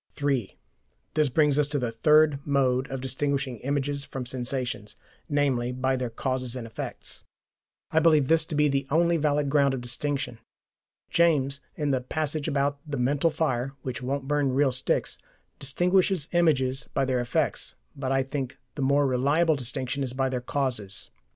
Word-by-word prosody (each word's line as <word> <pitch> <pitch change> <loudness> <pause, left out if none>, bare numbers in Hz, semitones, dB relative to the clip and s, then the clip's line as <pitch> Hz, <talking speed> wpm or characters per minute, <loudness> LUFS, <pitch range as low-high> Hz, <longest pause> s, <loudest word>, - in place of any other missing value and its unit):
(3) 135 -8 -1 0.6
This 155 -2 +3
brings 150 +1 +3
us 145 - +3
to 145 0 -1
the 125 -4 -1
third 150 +4 +4
mode 135 -2 +1
of 135 -1 -4
distinguishing 135 -1 -1
images 140 +2 -1
from 135 -2 -6
sensations, 125 -4 -3 0.3
namely, 135 -4 +1
by 130 +1 0
their 125 -2 -2
causes 130 +1 -2
and 125 -2 -5
effects. 115 - -7 0.7
I 160 - +4
believe 155 -4 +4
this 165 +1 +4
to 155 - -5
be 150 0 +4
the 135 -1 0
only 170 +2 +3
valid 150 -1 +1
ground 140 -2 +3
of 125 - -5
distinction. 135 0 -2 0.7
James, 140 -5 +2
in 150 -2 0
the 130 -1 +1
passage 155 +2 -2
about 140 -1 0
the 145 -2 -3
mental 140 +6 +2
fire 135 -5 -1
which 130 -1 -4
won't 135 +1 -3
burn 145 -2 +1
real 135 0 +3
sticks, 130 +1 0 0.4
distinguishes 180 +3 +1
images 135 -7 +2
by 135 - +2
their 130 -1 +1
effects, 120 - -1 0.2
but 135 -1 -3
I 135 0 +2
think 135 -1 -4 0.2
the - - -5
more 140 +2 +3
reliable 145 +6 +3
distinction 130 +1 -2
is 130 -2 -2
by 130 0 0
their 125 -1 -2
causes. 120 -7 -2
140 Hz, 165 wpm, -27 LUFS, 130-145 Hz, 0.7 s, third